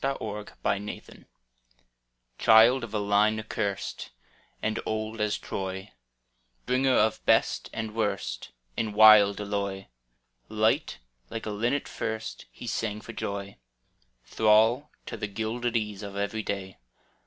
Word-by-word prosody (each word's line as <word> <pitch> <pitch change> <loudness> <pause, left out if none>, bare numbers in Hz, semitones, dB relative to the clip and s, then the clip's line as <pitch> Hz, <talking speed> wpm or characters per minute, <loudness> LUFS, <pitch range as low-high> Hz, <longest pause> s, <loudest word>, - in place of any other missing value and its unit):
E105] 105 -6 -3
BON 100 +1 0
VOYAGE - - -9 1.1
Child 115 +3 +6
of 115 - -6
a 110 - -1
line 105 +1 +2
accurst 105 -2 -3 0.5
And 110 0 -1
old 110 0 -3
as 105 0 +1
Troy, 95 +1 -5 0.7
Bringer 130 +1 +2
of 110 +1 +2
best - - +2
and 110 -1 -4
worst 95 - -2 0.3
In 110 -2 -2
wild 105 -1 +7
alloy 100 -2 -3 0.4
— - - -45
Light, - - +2 0.3
like 115 - -5
a 110 - -3
linnet 120 +7 -1
first. 110 0 -5
He - - -10
sang 105 -2 -2
for 115 - -9
joy. 100 -2 -5 0.7
Thrall 110 +6 +3 0.2
to - - -6
the 105 - -3
gilded 115 +3 -2
ease 105 -2 -4
Of 100 -1 -7
every 100 +2 -2
day. 100 -2 -5
105 Hz, 130 wpm, -27 LUFS, 100-110 Hz, 1.1 s, wild